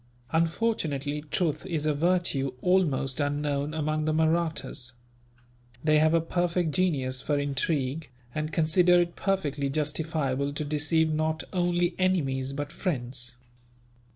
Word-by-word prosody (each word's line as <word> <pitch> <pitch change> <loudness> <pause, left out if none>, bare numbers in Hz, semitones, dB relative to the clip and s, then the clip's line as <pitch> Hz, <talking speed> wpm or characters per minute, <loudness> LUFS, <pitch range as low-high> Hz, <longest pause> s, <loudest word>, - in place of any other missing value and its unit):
Unfortunately, 160 -5 0
truth 165 -3 0
is 160 -4 -2
a 155 - +2
virtue 150 -5 +1
almost 155 -8 +2
unknown 145 0 -1
among 155 0 0
the 155 - +1
Mahrattas. 160 -5 0 0.9
They 155 0 +4
have 155 +1 +4
a - - +5
perfect 175 0 0
genius 140 -8 0
for 145 - 0
intrigue, 145 +1 -1 0.2
and 155 0 -2
consider 175 +3 +4
it 170 0 -2
perfectly 145 -8 -1
justifiable 145 -2 -1
to 150 +1 -3
deceive 155 +2 +1
not 155 +1 0
only 175 -1 +1
enemies, 135 -8 +1
but 145 +1 -4
friends. 125 -8 -3
155 Hz, 125 wpm, -28 LUFS, 140-170 Hz, 0.9 s, a